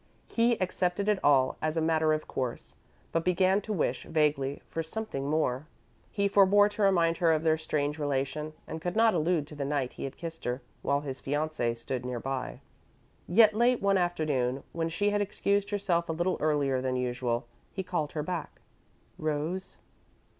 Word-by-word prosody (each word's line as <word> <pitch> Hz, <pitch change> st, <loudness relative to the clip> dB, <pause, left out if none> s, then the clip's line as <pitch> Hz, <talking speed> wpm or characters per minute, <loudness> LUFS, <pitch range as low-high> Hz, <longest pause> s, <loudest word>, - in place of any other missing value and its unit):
He 235 Hz, 0 st, +2 dB
accepted 185 Hz, +1 st, 0 dB
it 210 Hz, -2 st, +3 dB
all 135 Hz, -3 st, +4 dB
as 155 Hz, +1 st, -1 dB
a -, -, +4 dB
matter 160 Hz, -1 st, +2 dB
of 155 Hz, 0 st, -1 dB
course, 125 Hz, -3 st, -4 dB, 0.4 s
but 165 Hz, -, 0 dB
began 185 Hz, +3 st, +3 dB
to 215 Hz, -, -6 dB
wish, 190 Hz, -7 st, -1 dB
vaguely, 145 Hz, -3 st, 0 dB
for 165 Hz, -, -3 dB
something 160 Hz, -5 st, -4 dB
more. 150 Hz, -2 st, 0 dB, 0.4 s
He 200 Hz, -1 st, 0 dB
forebore 200 Hz, +1 st, +5 dB
to 210 Hz, +1 st, -5 dB
remind 170 Hz, -4 st, +3 dB
her 170 Hz, -2 st, +3 dB
of 160 Hz, 0 st, +1 dB
their 160 Hz, -1 st, +3 dB
strange 150 Hz, -1 st, -1 dB
relation, 145 Hz, +2 st, -2 dB
and 160 Hz, -, -6 dB
could 175 Hz, +3 st, -3 dB
not 225 Hz, 0 st, +5 dB
allude 165 Hz, -2 st, +1 dB
to 150 Hz, -, -11 dB
the 145 Hz, -, -3 dB
night 140 Hz, -2 st, -1 dB
he -, -, -5 dB
had 135 Hz, -, -7 dB
kissed 165 Hz, -1 st, -7 dB
her, 125 Hz, +2 st, -2 dB, 0.2 s
while 140 Hz, 0 st, +1 dB
his 135 Hz, -2 st, -5 dB
fiancee 145 Hz, -4 st, -1 dB
stood 125 Hz, +2 st, -4 dB
near 125 Hz, -1 st, -3 dB
by. 135 Hz, +1 st, -4 dB, 0.7 s
Yet, 215 Hz, +4 st, +6 dB
late 240 Hz, +3 st, +3 dB
one 195 Hz, -1 st, +3 dB
afternoon, 150 Hz, -7 st, 0 dB
when 165 Hz, -1 st, -2 dB
she 205 Hz, +5 st, +1 dB
had 205 Hz, 0 st, +1 dB
excused 200 Hz, 0 st, 0 dB
herself 180 Hz, -5 st, 0 dB
a -, -, 0 dB
little 175 Hz, +3 st, 0 dB
earlier 145 Hz, -4 st, +1 dB
than 130 Hz, 0 st, -1 dB
usual, 125 Hz, -1 st, -1 dB, 0.3 s
he 190 Hz, -, -4 dB
called 155 Hz, -5 st, -2 dB
her 150 Hz, -, -2 dB
back. 170 Hz, -1 st, -5 dB, 0.6 s
"Rose?" 155 Hz, +5 st, -2 dB
160 Hz, 180 wpm, -29 LUFS, 140-185 Hz, 0.7 s, Yet